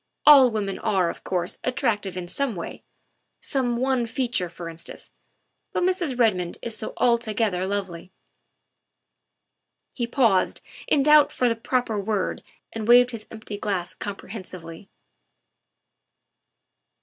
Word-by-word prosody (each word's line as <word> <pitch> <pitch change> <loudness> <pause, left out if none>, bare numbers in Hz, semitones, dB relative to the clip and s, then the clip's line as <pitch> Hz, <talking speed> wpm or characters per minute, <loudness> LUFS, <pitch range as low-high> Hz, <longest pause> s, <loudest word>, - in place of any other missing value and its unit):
All 280 -4 +9
women 205 -3 -3
are, 190 -6 +1
of - - -13
course, 180 -2 -2
attractive 205 -6 -1
in 180 -1 -5
some 265 +3 -2
way, 170 - -7 0.6
some 245 -3 -1
one 255 -1 +1
feature, 235 -6 -1
for 170 0 -8
instance, 165 0 -8 0.6
but - - 0
Mrs. 355 -8 0
Redmond 185 -8 +1
is 230 -2 -3
so 215 - -4
altogether 220 -6 +1
lovely 190 -3 -4 1.0
" - - -54
He 240 -2 -2
paused 230 -7 +2 0.3
in 280 - +3
doubt 300 0 +6
for 250 - +1
the 230 - +1
proper 230 -1 -1
word 205 0 -2 0.3
and 225 -1 -4
waved 245 +1 +7
his 220 -3 -7
empty 215 -2 -8
glass 185 -4 -2
comprehensively. 185 -4 -8
220 Hz, 125 wpm, -24 LUFS, 185-245 Hz, 1.0 s, All